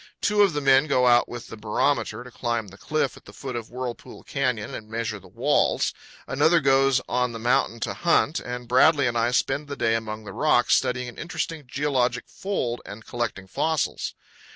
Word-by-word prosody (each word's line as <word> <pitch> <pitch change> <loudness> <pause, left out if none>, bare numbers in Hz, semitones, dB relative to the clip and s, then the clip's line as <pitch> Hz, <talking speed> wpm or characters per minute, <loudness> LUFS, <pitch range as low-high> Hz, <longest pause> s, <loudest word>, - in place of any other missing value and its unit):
Two 210 0 +2
of 195 -4 +4
the 145 - -1
men 135 +1 +5
go 130 -3 +3
out 120 0 +5
with 120 -1 -8
the - - -7
barometer 110 +2 0
to 125 - -12
climb 115 -4 -2
the 95 - -14
cliff 155 -3 -1
at - - -16
the - - -12
foot 130 -3 -6
of 115 -2 -5
Whirlpool 125 -1 -7
Canyon 125 -6 -2
and 110 0 -8
measure 110 -2 -3
the 95 - -16
walls; - - +1 0.3
another 170 +1 +3
goes 135 -2 +4
on 125 -1 0
the - - -5
mountain 115 0 +1
to - - -2
hunt; 170 -2 +2
and 125 0 -6
Bradley 140 +4 +5
and 120 -1 0
I 115 +1 +2
spend 135 +3 0
the 140 - -5
day 115 -1 +2
among 110 -1 -3
the 105 - -8
rocks, - - +3
studying 125 0 +1
an 120 - -9
interesting 165 -2 -4
geologic 125 -2 0
fold 125 -12 -3
and 105 +2 -10
collecting 120 -5 -3
fossils. 160 +10 -1
125 Hz, 200 wpm, -25 LUFS, 115-140 Hz, 0.3 s, men